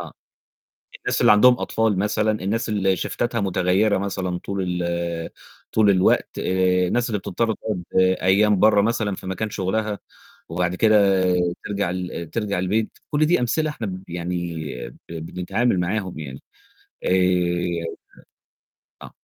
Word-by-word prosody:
آه، - - -8 0.9
الناس - - -2
اللي - - +6
عندهم 125 +4 +6
أطفال 110 -4 0
مثلًا، 105 +1 +1
الناس 110 +5 -1
اللي 95 -3 +1
شيفتاتها 120 +6 -2
متغيّرة 95 +2 +2
مثلًا 95 -2 -3
طول 90 -2 -3
ال 85 -1 -3 0.4
طول 110 -2 +4
الوقت، 95 -2 +2
آآ، 90 0 +2
الناس 120 +3 0
اللي 105 - 0
بتضطر 110 +4 -1
تقعد 100 -4 -4 0.4
أيام 100 +1 +4
برّه 105 -1 +5
مثلًا 110 -2 0
في - - -10
مكان 95 +3 -3
شغلها، 105 +2 -2 0.5
وبعد 90 +1 -1
كده 100 -2 +4 0.5
ترجع 100 -3 -1
ل 90 -2 -5
ترجع 105 -4 -1
البيت، 105 +4 -1
كُلّ 150 +1 +2
دي 175 -1 +3
أمثلة 155 +6 0
إحنا 120 -7 -5
ب 95 0 -6
يعني 85 0 -3 0.5
ب - - -7
بنتعامل 90 +6 -1
معاهم 95 -2 -2
يعني. 70 -3 -8 0.6
آآ 90 -2 +1 1.2
آه. - - -10
95 Hz, 135 wpm, -22 LUFS, 90-110 Hz, 1.2 s, اللي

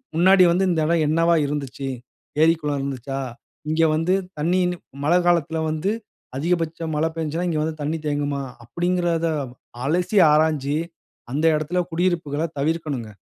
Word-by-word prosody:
முன்னாடி 185 +3 +6
வந்து 180 +3 +2
இந்த 170 -2 +1
இடம் 165 -1 +2
என்னவா 165 +2 +3
இருந்துச்சு? 140 -2 -4 0.5
ஏரி, 165 +1 +6
குளம் 145 -2 -1
இருந்துச்சா? 135 0 -4 0.5
இங்க 160 +1 +2
வந்து 165 +4 +1 0.3
தண்ணி, 170 +5 +2
கிண்ணி 180 0 -1 0.3
மழை 170 +4 +4
காலத்தில 165 -2 +2
வந்து, 160 +6 -1 0.5
அதிகபட்சம் 165 0 -1
மழை 155 +2 +1
பெஞ்சுசுனா, 165 +2 -2
இங்க 155 -2 0
வந்து 160 0 -4
தண்ணி 150 +3 -1
தேங்குமா? 145 -1 -1 0.2
அப்படீன்கிறத 170 +4 0 0.6
அலசி, 180 +7 +1
ஆராய்ஞ்சு, 150 -2 +2 0.5
அந்த 150 +5 0
இடத்தில 155 +4 -1
குடியிருப்புகள்ல 165 -3 0
தவிர்க்கனும்ங்க. 145 -7 -2
160 Hz, 135 wpm, -23 LUFS, 145-170 Hz, 0.6 s, முன்னாடி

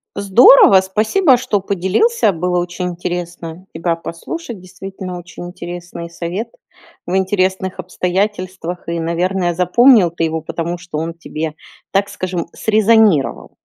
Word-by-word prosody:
Здорово, 200 0 +7
спасибо, 220 - +2
что 205 -5 -1
поделился, 200 - +1
было 180 +2 -1
очень 180 +1 -3
интересно 175 0 -6
тебя 165 +1 -1
послушать, 225 - -7
действительно 185 0 -8
очень 175 0 -10
интересный 175 -1 -8
совет 180 +7 -5 0.6
в 180 - -2
интересных 190 -1 0
обстоятельствах 185 -1 -3
и, 170 0 -2
наверное, 175 +2 -1
запомнил 185 +2 +5
ты 165 -1 -1
его, 160 0 -2
потому 170 +2 -4
что 175 -3 -7
он 165 +1 -3
тебе, 160 -2 -5 0.4
так 200 +1 +1
скажем, 180 -3 -4
срезонировал. 215 -7 +2
180 Hz, 125 wpm, -17 LUFS, 170-200 Hz, 0.6 s, Здорово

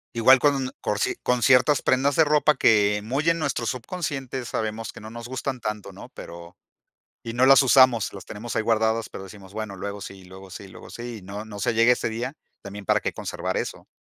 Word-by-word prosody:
Igual 130 +3 +6
con 135 -2 +1
con 105 - -1
cier - - 0
con 125 -1 +1
ciertas 135 +3 +4
prendas 135 +2 +1
de 160 - +6
ropa 150 0 +3
que 105 -1 +3
muy 135 +9 0
en 165 0 +1
nuestros 130 -6 -1
subconscientes, 130 -3 -4
sabemos 110 0 -3
que - - -12
no 110 - -10
nos 115 +1 -9
gustan 130 -1 -4
tanto, 105 -2 -5
¿no?, - - -11
pero 85 +1 -11 0.7
y 115 - -5
no 120 +2 +2
las 135 +1 +7
usamos, 130 -4 +4
las 100 - -10
tenemos 115 +3 -7
ahí 110 - +1
guardadas, 110 0 +1
pero 95 - -9
decimos, 95 -1 -13
bueno, 110 -2 -5
luego 100 +2 -6
sí, 95 -1 -10
luego 95 +1 -13
sí, 95 +1 -9
luego - - -13
sí, 120 0 -7
y 100 - -15
no 100 +3 -7
no 105 -2 -9
se 110 +4 0
llegue 115 +2 +4
ese 125 - -1
día, 120 +5 -4 0.3
también 100 0 -9
para - - +2
que - - -3
conservar - - -4
eso. - - -5
115 Hz, 220 wpm, -24 LUFS, 105-130 Hz, 0.7 s, las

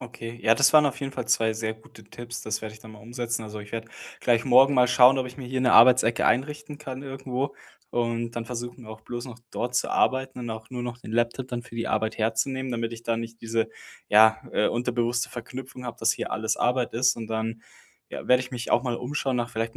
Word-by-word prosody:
Okay, 120 -1 -8
ja, 115 - +5
das 135 +2 +4
waren 150 -1 +7
auf 140 - -2
jeden 135 -1 -4
Fall - - -4
2 110 -1 +3
sehr 110 0 -2
gute 110 -1 -17
Tipps. 120 +2 -8
Das 105 -1 -2
werde 110 0 -7
ich 110 - -15
dann 110 - -12
mal 105 - -13
umsetzen, 120 0 -3
also, 105 0 -7
ich 105 +1 -12
werde 115 0 -4 0.3
gleich 115 -1 +2
morgen 135 +2 +6
mal 125 -1 +5
schauen, 125 +2 +6
ob 130 - -1
ich 125 0 -10
mir 130 -3 -7
hier 130 +1 -2
'ne 125 -1 +3
Arbeitsecke 120 -1 +6
einrichten 150 +3 0
kann 135 -2 -7
irgendwo, 135 0 -4 0.4
und 115 -1 -1
dann 115 -1 -4
versuchen, 120 0 -7
auch 110 0 -10
bloß 120 +2 -6
noch 125 -2 -10
dort 125 +1 -3
zu - - +1
arbeiten 130 -1 +1
und 120 - -5
auch 110 +1 -7
nur 125 -2 -5
noch 120 0 -5
den 110 - -9
Laptop 120 +2 0
dann 120 -2 -4
für 115 - -12
die 115 - -2
Arbeit 110 0 -1
herzunehmen, 125 +4 -1
damit 115 0 -2
ich 115 0 -9
da 115 -1 0
nicht 115 0 -7
diese, 115 0 -1 0.4
ja, 110 +1 +6
äh, - - +2
unterbewusste 120 0 0
Verknüpfung 125 +1 -8
habe, 120 - -6
dass - - +3
hier - - -5
alles 110 0 -1
Arbeit 125 0 +1
ist. 125 +2 +3
Und 115 -1 -6
dann, 110 0 -3 0.5
ja, - - -7
werde 125 0 +5
ich 125 - -9
mich 125 -1 -5
auch 120 - +4
mal 120 -2 -1
umschauen 135 0 -2
nach 120 0 -1
vielleicht 115 -1 -3
120 Hz, 240 wpm, -26 LUFS, 115-130 Hz, 0.5 s, waren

